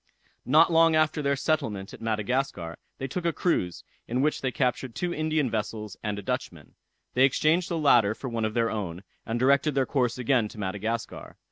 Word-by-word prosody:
Not 155 +6 +5
long 165 0 +5
after 155 0 +2
their 140 -1 +1
settlement 135 -10 -2
at - - -11
Madagascar, 110 -5 -2 0.2
they 135 - -4
took 175 +7 -4
a 170 - +2
cruise, 90 - -1 0.2
in 125 +3 0
which 150 - 0
they 130 - -1
captured 125 -1 -1
two 175 -1 -2
Indian 155 -2 0
vessels 105 -2 -4
and 105 -2 -3
a 100 - -6
Dutchman. - - -4 0.4
They 130 - +4
exchanged 155 +6 +3
the 170 - -1
latter 120 -9 +4
for 135 - -7
one 115 -2 -2
of 110 0 -2
their 115 -1 +1
own, 95 -4 -4 0.2
and 115 +1 -1
directed 140 +3 +3
their 135 -1 +2
course 125 -4 0
again 125 -2 +2
to 105 - -13
Madagascar. 110 +4 -4
125 Hz, 195 wpm, -27 LUFS, 110-150 Hz, 0.4 s, Not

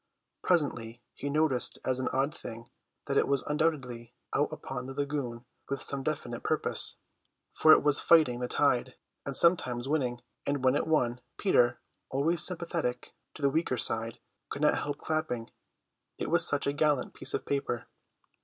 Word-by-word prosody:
Presently 120 -9 0
he 145 - -4
noticed 145 -4 +1
as 130 0 +1
an 130 - -1
odd 135 +4 0
thing 115 +1 -9 0.3
that - - 0
it - - +4
was 140 -1 +1
undoubtedly 130 -7 -1 0.2
out 145 - +1
upon 135 -4 -6
the 135 - -7
lagoon 140 -4 -3 0.2
with 140 0 -1
some 140 0 -2
definite - - -3
purpose, - - 0 0.6
for 155 - +6
it - - +7
was 145 -1 +5
fighting 155 -8 +5
the 125 - -2
tide, 130 -2 +1 0.3
and 140 - -3
sometimes 135 -8 +2
winning; 130 -5 0 0.2
and 140 -2 -1
when 130 +1 +4
it - - 0
won, 125 -6 +1 0.2
Peter, 120 - +3 0.3
always 155 +5 +1
sympathetic 170 -8 -2 0.2
to 150 - -9
the 140 - +4
weaker 155 -4 0
side, 115 +1 -1 0.3
could 145 - -4
not 150 - +4
help 145 -1 -3
clapping; 155 -8 -2 0.7
it - - -3
was - - +4
such 145 -1 0
a 140 - +1
gallant 150 -3 +1
piece - - -1
of - - -3
paper. 140 -4 -2
140 Hz, 165 wpm, -30 LUFS, 125-150 Hz, 0.7 s, it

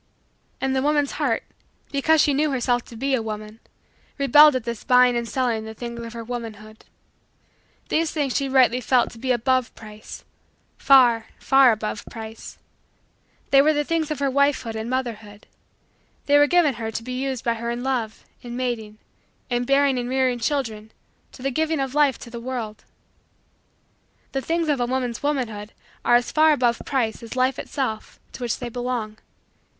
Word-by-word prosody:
And 265 0 -1
the 265 - +1
woman's 290 0 +1
heart, 275 -7 -1 0.5
because 310 +3 +3
she 290 - +3
knew 300 +2 +1
herself 245 -2 0
to 235 - -12
be 270 +4 -1
a 255 - +2
woman, 215 0 -7 0.6
rebelled 295 +1 +6
at 255 - -1
this 235 -2 -5
buying 250 -1 +5
and 235 -1 -2
selling 240 -4 -1
the 220 0 -8
things 235 0 -6
of 230 0 -8
her 230 -1 -6
womanhood. 220 -2 -8 1.0
These 325 0 +1
things 285 -5 -2
she 275 -1 0
rightly 255 -2 +4
felt 245 0 +2
to 230 - -13
be 255 +2 -1
above 255 +1 +1
price 215 -1 -11 0.5
far, 240 -5 +5
far, 270 -2 +5
above 215 -1 -3
price. 220 -1 -9 0.9
They 275 - +7
were 310 +2 +3
the 295 0 0
things 325 0 -1
of 305 - -2
her 280 -1 0
wifehood 280 -4 +1
and 220 +1 -4
motherhood. 225 -5 -4 0.8
They 290 0 +5
were 290 - +5
given 340 -4 +3
her 220 - -2
to 225 +1 -5
be 255 +1 -4
used 265 -3 -3
by 235 - +2
her 235 +1 -5
in 240 +1 -3
love, 245 -5 -3 0.2
in 240 0 -7
mating, 230 -4 -3 0.5
in 245 0 0
bearing 275 -1 +3
and 245 0 -4
rearing 260 -2 +1
children, 225 -5 -2 0.5
in 255 - -12
the 275 - 0
giving 315 +3 0
of 270 -1 -2
life 290 -3 +3
to 235 - -10
the 235 - -6
world. 235 -4 -5 1.5
The 270 - -2
things 330 +3 -1
of 290 -3 +1
a 245 - 0
woman's 250 -2 -2
womanhood 230 -8 -3 0.3
are 240 - +4
as 240 0 +1
far 310 0 +5
above 240 -4 +1
price 235 -5 -1
as 230 +1 -8
life 255 0 +1
itself 225 -7 -4
to - - -11
which 240 -2 -1
they 245 - -5
belong. 235 -3 -4
250 Hz, 180 wpm, -23 LUFS, 230-275 Hz, 1.5 s, They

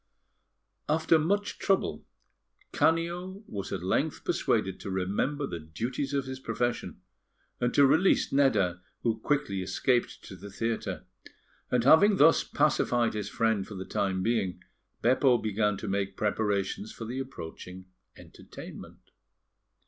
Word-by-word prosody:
After 160 +1 +3
much 200 +6 -1
trouble, 190 - 0 0.6
Canio 175 +4 0
was 100 - -6
at - - -3
length - - -1
persuaded 95 -1 0
to 100 - -6
remember 100 +10 -1
the 85 -9 -5
duties 120 - -4
of 140 -1 -1
his 130 0 -6
profession, 115 -7 -3 0.6
and 120 0 +1
to 140 - +7
release 160 +5 +3
Nedda, 95 -11 +2 0.2
who 115 -2 0
quickly 140 -7 -1
escaped 120 +7 0
to 95 - -10
the 100 +2 -10
theatre; 100 -3 -3 0.6
and 125 -2 +2
having 195 - +6
thus 165 -1 +5
pacified 120 -6 +1
his 105 -1 -4
friend 115 -4 0
for 105 - -8
the 95 0 -6
time 95 -2 -1
being, 95 -6 -1 0.4
Beppo 125 +1 +4
began 105 -2 0
to 105 - -6
make 100 0 -2
preparations 105 - -1
for 115 - -8
the 125 +4 -4
approaching 95 -7 -8 0.3
entertainment. - - -12
115 Hz, 135 wpm, -29 LUFS, 95-140 Hz, 0.6 s, to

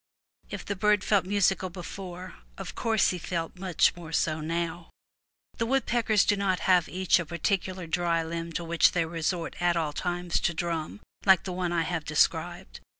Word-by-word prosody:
If - - -6
the 200 - -2
bird 210 +1 +2
felt 200 -3 +2
musical 195 -1 +2
before, 180 0 -8 0.2
of - - -6
course 225 -3 +2
he 180 - -4
felt 170 +1 -4
much 185 -3 +2
more 170 -2 -9
so 160 -1 +1
now. 170 +1 -3 0.7
The 230 - 0
woodpeckers 235 -5 +2
do 205 - +3
not 195 -2 0 0.3
each 185 0 +3
have 170 -3 -3
a - - -24
particular 185 +1 -1
dry 170 0 0
limb 165 +1 -5
to 170 - -3
which 170 0 +3
they 170 -2 +1
resort 165 +1 -2
at 175 -1 +2
all 155 -3 -1
times 175 +1 -1
to 170 - 0
drum, 170 +3 -3 0.2
like 190 -2 +5
the 185 - -4
one 180 -1 -2
I 170 -1 +1
have 165 -1 -2
de 155 - -6
scribed. - - +1
175 Hz, 185 wpm, -28 LUFS, 165-190 Hz, 0.7 s, like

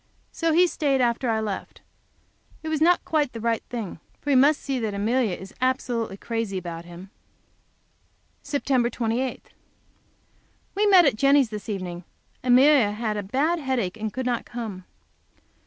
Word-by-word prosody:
So 330 -1 0
he 350 +3 +5
stayed 285 -6 0
after 240 0 +1
I 220 -1 +1
left. 205 -3 -5 0.8
It 315 - -4
was 310 -1 -1
not 345 +2 +4
quite 300 -4 0
the 230 -1 -1
thing 245 - -4
in 215 - -4
him, 170 - -11 0.2
for 290 - -2
he - - +4
must 280 +3 +5
see 270 -2 -3
that 215 -3 -2
Amelia 220 0 +1
is 190 +2 -11
absolutely 245 -5 -1
crazy 225 -3 -3
about 170 -2 -6
him. 175 +3 -11 1.3
Sept. 270 -4 0
28. 245 +2 -3 1.2
We 415 +2 +2
met 375 -4 +7
at 270 -7 +2
Jenny's 275 -2 +4
this 210 +1 -7
evening. 180 -3 -4 0.4
Amelia 255 -3 +5
had 215 0 -2
a 205 - -2
bad 285 - 0
headache 255 - -1
and 220 0 -3
could 260 +3 -4
not 245 -2 -1
come. 215 -6 -7
240 Hz, 160 wpm, -25 LUFS, 210-275 Hz, 1.3 s, met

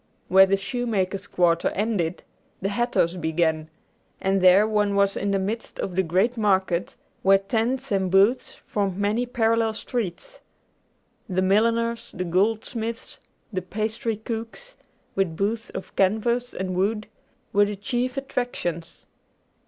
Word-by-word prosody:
Where 190 +1 +7
the 195 +1 +2
shoemakers' 200 -4 -2
quarter 170 -2 +2
ended, 190 -5 -1 0.4
the 195 - -1
hatters' 200 -5 +1
began, 160 -1 0 0.5
and 195 0 +1
there 185 +3 +6
one 210 -2 +1
was 200 0 +3
in 200 - -1
the 200 - +2
midst 210 +4 -3
of 180 - -3
the 190 - +4
great 190 +8 +1
market 190 -5 +1 0.3
where 195 0 +6
tents 235 +6 -1
and 190 -2 +1
booths 200 +7 +3
formed 195 -3 -1
many 210 +5 0
parallel 225 -1 +1
streets. 240 - -4 0.9
The 185 0 +1
milliners, 230 +4 +1
the 185 - -2
goldsmiths, 225 +5 -1 0.3
the 185 - -1
pastry 215 +4 -2
cooks, 230 - -6 0.4
with 180 -5 -1
booths 220 +3 -1
of 190 - -8
canvas 235 +5 +1
and 185 -1 -3
wood, 210 +3 0 0.5
were 205 +1 +5
the 205 0 -3
chief 245 +6 -2
attractions. 210 - -3
205 Hz, 135 wpm, -24 LUFS, 185-230 Hz, 0.9 s, Where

